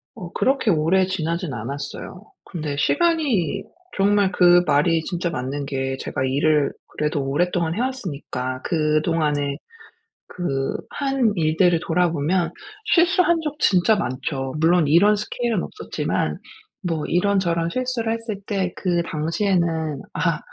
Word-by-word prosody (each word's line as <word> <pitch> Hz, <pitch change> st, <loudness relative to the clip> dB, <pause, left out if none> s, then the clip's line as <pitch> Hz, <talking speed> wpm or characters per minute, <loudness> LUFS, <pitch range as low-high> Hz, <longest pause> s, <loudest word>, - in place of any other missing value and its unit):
어 180 Hz, -7 st, -8 dB
그렇게 265 Hz, -5 st, +2 dB
오래 170 Hz, +4 st, +3 dB
지나지는 170 Hz, -3 st, -2 dB
않았어요. 140 Hz, -, -6 dB, 0.2 s
근데 155 Hz, -5 st, -4 dB
시간이 250 Hz, -, +1 dB, 0.3 s
정말 200 Hz, 0 st, +3 dB
그 175 Hz, -1 st, +5 dB
말이 160 Hz, +2 st, +2 dB
진짜 175 Hz, +1 st, -2 dB
맞는 140 Hz, -1 st, -3 dB
게 135 Hz, -1 st, -2 dB
제가 130 Hz, -, -3 dB
일을 145 Hz, +2 st, +2 dB, 0.3 s
그래도 150 Hz, -2 st, 0 dB
오랫동안 170 Hz, +3 st, 0 dB
해 225 Hz, -, -1 dB
왔으니까 150 Hz, -, -4 dB
그동안에 155 Hz, -3 st, 0 dB, 0.7 s
그 135 Hz, -7 st, -2 dB
한 270 Hz, -6 st, 0 dB
일들을 165 Hz, +1 st, +3 dB
돌아보면 170 Hz, 0 st, +1 dB, 0.3 s
실수한 350 Hz, 0 st, +4 dB
적 300 Hz, -1 st, -4 dB
진짜 195 Hz, +3 st, +4 dB
많죠. 135 Hz, -3 st, -3 dB
물론 165 Hz, -1 st, +4 dB
이런 200 Hz, +8 st, +5 dB
스케일은 220 Hz, 0 st, -2 dB
없었지만 430 Hz, -, -3 dB, 0.5 s
뭐 165 Hz, -4 st, -2 dB
이런저런 175 Hz, -3 st, +1 dB
실수를 250 Hz, 0 st, -1 dB
했을 230 Hz, -3 st, -5 dB
때 190 Hz, -4 st, -1 dB
그 175 Hz, -2 st, 0 dB
당시에는' 165 Hz, -2 st, -1 dB
아. -, -, 0 dB
170 Hz, 280 characters per minute, -22 LUFS, 150-200 Hz, 0.7 s, 그